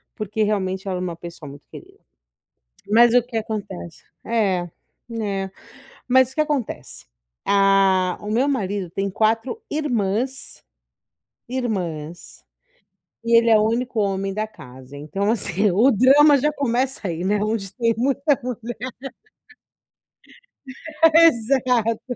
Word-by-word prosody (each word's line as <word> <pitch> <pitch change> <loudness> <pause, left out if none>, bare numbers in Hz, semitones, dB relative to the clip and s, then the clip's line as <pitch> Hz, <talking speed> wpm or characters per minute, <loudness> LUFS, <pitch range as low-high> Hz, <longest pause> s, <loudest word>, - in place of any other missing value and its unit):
porque 215 0 -2
realmente 190 -2 -2
ela 185 -1 -2
é - - -4
uma 175 -2 -4
pessoa 170 -3 -10
muito 145 +1 -13
querida. - - -14 0.9
Mas 235 +2 +5
o 245 - +5
que 240 -1 -8
acontece 200 -6 -6 0.2
É, 195 -6 0 0.5
é. 195 -2 -3 0.6
Mas 260 0 +4
o - - -17
que 305 - +2
acontece, 295 -6 -4 0.4
ah, 195 -2 +3
o 210 +1 -5
meu 250 +6 +2
marido 200 -8 -2
tem 195 +3 -3
4 225 - 0
irmãs, 255 -3 -2 0.9
irmãs, 175 -10 -5 0.8
e 230 0 +4
ele 230 0 +4
é 220 - +6
o - - +2
único 240 0 -2
homem 195 -1 -1
da 215 +2 -2
casa, 130 -9 -13
então, 175 +8 -3
assim, 205 -2 0
o 235 +9 +4
drama 280 +6 +6
já 300 +3 +1
começa 255 -5 -1
aí, 170 +2 -4
né, 205 +1 +1
onde 210 -3 -2
tem 230 -2 +1
muita 275 +2 0 1.1
mulher. - - -25 1.6
Exato. 250 -7 +3
215 Hz, 125 wpm, -22 LUFS, 190-245 Hz, 1.6 s, é